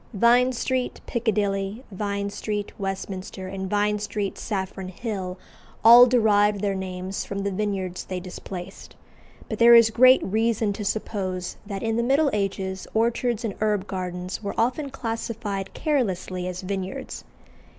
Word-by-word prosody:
Vine 240 Hz, +4 st, +5 dB
Street, 255 Hz, +1 st, -2 dB
Piccadilly, 210 Hz, -1 st, -1 dB
Vine 200 Hz, 0 st, -2 dB
Street, 205 Hz, 0 st, -3 dB
Westminster, 190 Hz, -1 st, -5 dB
and 190 Hz, 0 st, -5 dB
Vine 210 Hz, +1 st, +1 dB
Street, 205 Hz, -1 st, -3 dB
Saffron 190 Hz, -2 st, -4 dB
Hill, 190 Hz, -2 st, -5 dB, 0.5 s
all 240 Hz, +2 st, +10 dB
derived 210 Hz, -4 st, +3 dB
their 200 Hz, -1 st, 0 dB
names 190 Hz, 0 st, -4 dB
from 200 Hz, 0 st, -4 dB
the 200 Hz, -, -1 dB
vineyards 190 Hz, -2 st, -2 dB
they 185 Hz, -1 st, -4 dB
displaced; 180 Hz, +1 st, -8 dB, 0.5 s
but -, -, -5 dB
there 235 Hz, 0 st, +9 dB
is 230 Hz, -1 st, +7 dB
great 255 Hz, +3 st, +6 dB
reason 220 Hz, 0 st, +1 dB
to 210 Hz, -, -5 dB
suppose 190 Hz, -3 st, -3 dB
that 200 Hz, -2 st, -5 dB
in 225 Hz, 0 st, 0 dB
the -, -, +2 dB
Middle 275 Hz, +4 st, +3 dB
Ages 195 Hz, -2 st, -2 dB
orchards 235 Hz, +1 st, +1 dB
and 210 Hz, -, -2 dB
herb 210 Hz, -3 st, +1 dB
gardens 180 Hz, -1 st, -4 dB
were 200 Hz, -1 st, -4 dB
often 255 Hz, +5 st, 0 dB
classified 225 Hz, -5 st, -4 dB
carelessly 190 Hz, -, -1 dB
as 185 Hz, +1 st, -5 dB
"vineyards." 195 Hz, +7 st, -5 dB
205 Hz, 140 wpm, -25 LUFS, 190-230 Hz, 0.5 s, all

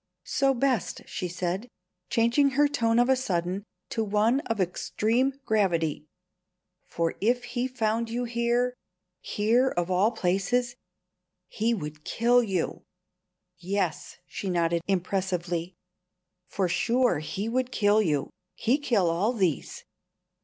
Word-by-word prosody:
"So 270 Hz, -1 st, +2 dB
best," 250 Hz, -5 st, 0 dB
she 180 Hz, -, -4 dB
said, 180 Hz, +5 st, -3 dB, 0.4 s
changing 235 Hz, +5 st, +3 dB
her 295 Hz, 0 st, +6 dB
tone 230 Hz, -5 st, +1 dB
of 245 Hz, +1 st, +4 dB
a 265 Hz, -, +4 dB
sudden 185 Hz, -5 st, -2 dB, 0.3 s
to 225 Hz, -, -1 dB
one 215 Hz, +5 st, +2 dB
of 225 Hz, -2 st, -2 dB
extreme 230 Hz, +8 st, 0 dB
gravity. 170 Hz, -8 st, +1 dB, 0.8 s
"For 165 Hz, -1 st, -1 dB
if 245 Hz, +4 st, +2 dB
he 245 Hz, +1 st, -2 dB
found 230 Hz, -2 st, -1 dB
you 240 Hz, +2 st, -2 dB
here 240 Hz, +1 st, 0 dB, 0.5 s
here 235 Hz, +5 st, +2 dB
of 175 Hz, -3 st, -2 dB
all 185 Hz, +4 st, +4 dB
places 230 Hz, +4 st, 0 dB, 0.7 s
he 230 Hz, +5 st, 0 dB
would 150 Hz, -4 st, -7 dB
kill 240 Hz, +6 st, +3 dB
you. 195 Hz, -7 st, -2 dB, 0.8 s
Yes" 185 Hz, -3 st, -2 dB
she 195 Hz, -, -5 dB
nodded 170 Hz, -1 st, +1 dB
impressively 180 Hz, -2 st, -1 dB, 0.7 s
"for 190 Hz, -2 st, -1 dB
sure 235 Hz, -, +2 dB, 0.2 s
we 205 Hz, +3 st, -1 dB
would 255 Hz, +2 st, -1 dB
kill 210 Hz, -2 st, +3 dB
you. 150 Hz, -8 st, 0 dB, 0.2 s
He 245 Hz, +6 st, +1 dB
kill 225 Hz, -10 st, +2 dB
all 180 Hz, +8 st, +1 dB
these." 185 Hz, -, -1 dB
215 Hz, 125 wpm, -27 LUFS, 180-245 Hz, 0.8 s, her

